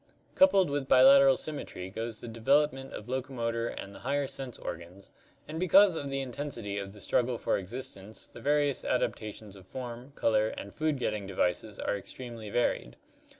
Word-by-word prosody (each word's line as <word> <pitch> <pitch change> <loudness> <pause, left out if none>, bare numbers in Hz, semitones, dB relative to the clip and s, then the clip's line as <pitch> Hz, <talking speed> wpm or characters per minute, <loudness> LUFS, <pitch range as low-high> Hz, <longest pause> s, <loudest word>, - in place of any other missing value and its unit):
Coupled 195 - +5
with 140 -2 -1
bilateral 135 +1 +7
symmetry 115 -11 -5
goes 115 +2 -5
the - - -7
development 135 +4 +1
of 105 - -8
locomotor 120 -3 -2
and 100 -3 -7
the - - -11
higher 140 +2 0
sense 130 -2 -6
organs, 85 +4 -8 0.4
and 160 +1 -5
because 185 +1 +6
of 140 -3 -3
the 135 0 -1
in 130 -2 -5
tensity 115 -7 -4
of 100 0 -8
the 105 - -13
struggle 120 +4 +1
for - - 0
existence 100 0 -6
the 120 - -12
various 145 0 +2
adaptations 110 -4 -2
of 95 -1 -15
form, 125 +3 -7
color, 110 -1 +2
and 100 - -8
food 155 -2 0
getting 105 -5 -2
devices 95 +3 -1
are - - -1
extremely 115 +1 -7
varied. 100 - 0
120 Hz, 170 wpm, -30 LUFS, 105-140 Hz, 0.4 s, bilateral